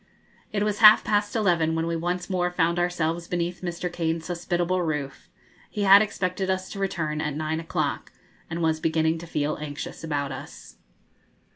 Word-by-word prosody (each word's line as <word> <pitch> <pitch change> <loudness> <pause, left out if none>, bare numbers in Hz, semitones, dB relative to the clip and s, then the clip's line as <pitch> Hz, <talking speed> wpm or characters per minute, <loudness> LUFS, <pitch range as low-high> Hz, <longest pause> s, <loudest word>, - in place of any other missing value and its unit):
It 205 -1 0
was 210 -1 -1
half 215 -1 +9
past 205 0 0
eleven 170 -7 +2
when 165 0 0
we 170 0 -1
once 175 +2 -2
more 180 -2 0
found 170 -1 +1
ourselves 170 -1 -1
beneath 175 0 -2
Mr. 175 0 -4
Kane's 165 -1 -2
hospitable 175 +1 -1
roof; 150 -5 -4 0.4
he 210 - -3
had 200 +1 +8
expected 190 -2 -2
us 185 0 -2
to 200 - -6
return 165 -6 -2
at 150 -2 -2
nine 155 +1 -2
o'clock, 165 - -2 0.4
and 170 +1 -3
was 160 -1 +1
beginning 160 0 +1
to 170 - -9
feel 150 -1 -1
anxious 145 +1 -6
about 145 -3 -2
us. 130 - -10
170 Hz, 170 wpm, -25 LUFS, 160-185 Hz, 0.4 s, half